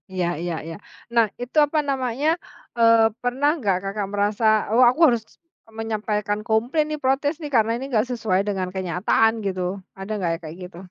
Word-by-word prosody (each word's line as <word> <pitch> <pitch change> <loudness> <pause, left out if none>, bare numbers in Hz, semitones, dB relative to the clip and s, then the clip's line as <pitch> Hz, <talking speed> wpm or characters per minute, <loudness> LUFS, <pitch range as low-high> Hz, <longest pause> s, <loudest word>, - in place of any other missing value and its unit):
Iya 185 -2 -1 0.2
iya 175 0 -2
iya. 165 - -6 0.4
Nah 230 -1 +6 0.2
itu 245 +5 -6
apa 305 +2 -1
namanya, 265 +1 -1 0.5
eee, 230 -1 +5
pernah 255 +4 +1
nggak 200 -7 +1
Kakak 200 0 -3
merasa, 205 +2 0 0.3
"Oh, 240 +3 +5
aku 255 - -2
harus 235 -4 +1 0.6
menyampaikan 210 -2 -2
komplain 240 +8 +1
nih, 305 0 -3
protes 270 +3 +1
nih, 295 -2 -6
karena 225 -1 +3
ini 260 - -5
enggak 230 -2 +1
sesuai 215 -6 0
dengan 190 -3 -1
kenyataan 190 +4 +2
gitu." 185 -2 -2 0.4
Ada 195 +2 -6
enggak 180 -4 -1
kayak 155 0 -8
gitu? 180 -1 -10
225 Hz, 170 wpm, -23 LUFS, 195-250 Hz, 0.6 s, Nah